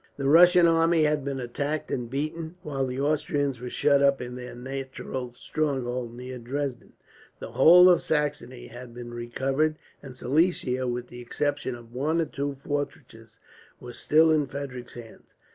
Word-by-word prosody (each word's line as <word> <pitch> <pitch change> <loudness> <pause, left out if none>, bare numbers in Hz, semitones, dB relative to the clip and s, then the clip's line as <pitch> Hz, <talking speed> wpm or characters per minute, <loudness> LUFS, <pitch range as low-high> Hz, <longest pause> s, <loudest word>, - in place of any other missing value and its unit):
The 140 -1 -2
Russian 175 +3 +7
army 165 0 +4
had 150 -2 +1
been 140 -1 -3
attacked 140 +5 -3
and 120 -2 -3
beaten, 155 +5 -4
while 135 -3 -2
the 125 +1 -4
Austrians 145 -2 0
were 125 +1 -6
shut 140 +1 +3
up 140 -1 +4
in 125 0 -6
their 125 0 -8
natural 130 0 -6
stronghold, 125 -5 -3
near 125 +1 -7
Dresden. 130 +1 -4 0.4
The - - -8
whole 180 +2 +8
of 180 -1 +5
Saxony 145 -5 -2
had 120 0 -11
been 120 -1 -8
recovered; 135 +6 -1 0.3
and 130 -3 -11
Silesia, 130 -3 +1
with 125 0 -4
the 120 0 -10
exception 145 +1 -2
of 120 -1 -14
one 150 +6 0
or 165 - +2
two 140 -1 -4
fortresses, 135 -5 -6 0.4
was 120 -1 -9
still 160 +1 +4
in 150 -3 +2
Frederick's 130 -3 -7
hands. 115 -2 -13
135 Hz, 160 wpm, -26 LUFS, 125-150 Hz, 0.4 s, whole